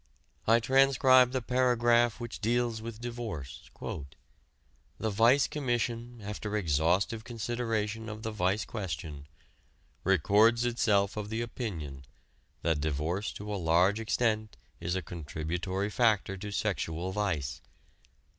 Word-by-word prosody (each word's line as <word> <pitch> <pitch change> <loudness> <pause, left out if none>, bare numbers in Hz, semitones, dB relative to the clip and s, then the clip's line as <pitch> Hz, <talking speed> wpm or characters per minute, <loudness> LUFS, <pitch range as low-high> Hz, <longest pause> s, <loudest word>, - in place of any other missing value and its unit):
I 115 +1 +6
transcribe 130 0 +5
the 130 -2 -2
paragraph 120 -2 +3
which 120 -1 -6
deals 120 0 0
with 115 -1 -7
divorce: 115 - -6 1.3
"The 110 - -1
Vice 115 +7 +5
Commission, 120 -3 -2
after 105 +1 -3
exhaustive 90 - +1
consideration 115 -2 -2
of 110 0 -7
the 110 - -2
vice 100 0 0
question, 75 -8 -5 0.8
records 105 +6 +4
itself 105 -4 +2
of 105 -1 -4
the 110 +1 -1
opinion 80 - -5 0.6
that 80 -3 +1
divorce 80 +7 -1
to 105 0 -6
a 100 - -3
large 90 +6 +3
extent 110 -1 0 0.2
is 85 +2 -2
a 95 - -2
contributory 85 +5 -3
factor 105 -4 +2
to 105 +2 -6
sexual 90 -2 -2
vice. 80 -8 -2
105 Hz, 115 wpm, -30 LUFS, 90-120 Hz, 1.3 s, I